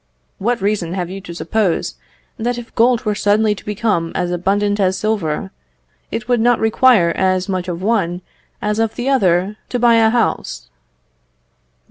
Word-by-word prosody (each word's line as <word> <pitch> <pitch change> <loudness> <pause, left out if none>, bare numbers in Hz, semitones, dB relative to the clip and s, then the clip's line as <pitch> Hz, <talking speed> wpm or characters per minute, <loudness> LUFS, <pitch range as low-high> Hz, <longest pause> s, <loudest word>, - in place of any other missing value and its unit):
What 225 +1 -1
reason 195 -4 -1
have 180 -2 -3
you 195 +1 -6
to 175 -3 -9
suppose 200 -1 -1 0.4
that 240 +2 -2
if 240 -1 -9
gold 240 0 +2
were 210 - +1
suddenly 210 +1 +2
to 210 - -11
become 205 -5 -1
as 175 -1 -1
abundant 205 +3 0
as 190 -1 +2
silver, 180 - -2 0.6
it 225 0 -4
would 245 -1 +2
not 240 +1 +3
require 220 -5 +4
as 185 0 +1
much 185 -2 -2
of 175 0 -4
one 185 -5 0 0.4
as 210 +1 0
of 225 -1 0
the 245 +1 -3
other 195 -5 +2
to 245 - -1
buy 235 -1 +4
a 225 -1 +5
house? 235 - -1
210 Hz, 165 wpm, -18 LUFS, 185-225 Hz, 0.6 s, a